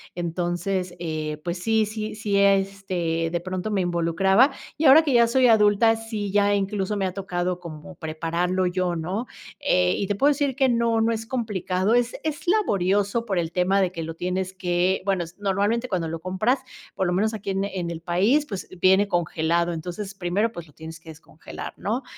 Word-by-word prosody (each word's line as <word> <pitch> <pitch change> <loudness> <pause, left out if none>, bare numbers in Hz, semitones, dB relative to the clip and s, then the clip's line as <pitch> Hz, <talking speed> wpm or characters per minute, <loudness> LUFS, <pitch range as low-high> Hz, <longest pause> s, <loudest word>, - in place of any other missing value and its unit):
Entonces, 175 +2 -2
eh, 155 -2 -3
pues 175 0 -3
sí 220 -1 +2
sí 215 0 -5
sí, 205 -2 -1
este, 195 -4 +1
de 175 - 0
pronto 185 +4 -4
me 195 -2 +1
involucraba 180 - +3 0.3
y 315 - 0
ahora 280 +3 +9
que 290 -4 0
ya 235 -1 +5
soy 255 +2 +4
adulta, 220 0 +5
sí 220 -3 -4
ya 205 0 +3
incluso 200 0 -1
me 195 - 0
ha 185 - -2
tocado 180 -2 -2
como 170 +1 -10
prepararlo 170 +3 -1
yo, 180 -1 -1
¿no?, 185 +8 -3 0.3
eh, 90 0 +2
y 200 - -2
te 205 - -1
puedo 275 +8 +3
decir 280 -2 0
que 265 -1 +3
no, 230 -1 +2
no 225 +1 +2
es 225 0 -3
complicado, 210 -4 -1
es 245 0 +2
es 315 +1 -4
laborioso 205 - +1
por 195 -5 -1
el 165 -1 -2
tema 185 +3 +2
de 185 - +1
que 165 -3 -5
lo 160 0 -6
tienes 185 +2 -2
que 180 0 0
bueno, 195 -3 +1 0.2
normalmente 205 +5 0
cuando 175 -6 -1
lo 165 +1 -4
compras, 190 +9 0 0.4
por 190 - 0
lo 175 - 0
menos 215 +5 +1
aquí 205 -2 -5
en 195 0 -1
en 185 -4 -3
el 165 -1 -6
país, 200 - +2
pues 195 -8 -6
viene 190 +3 +4
congelado, 170 -1 0
entonces 180 +5 -6
primero 195 +4 -1
pues 170 -7 -9
lo 150 - -20
tienes 160 +2 -10
que 165 - -15
descongelar, 155 0 -9
¿no?, 230 +6 -2
190 Hz, 195 wpm, -24 LUFS, 175-215 Hz, 0.4 s, ahora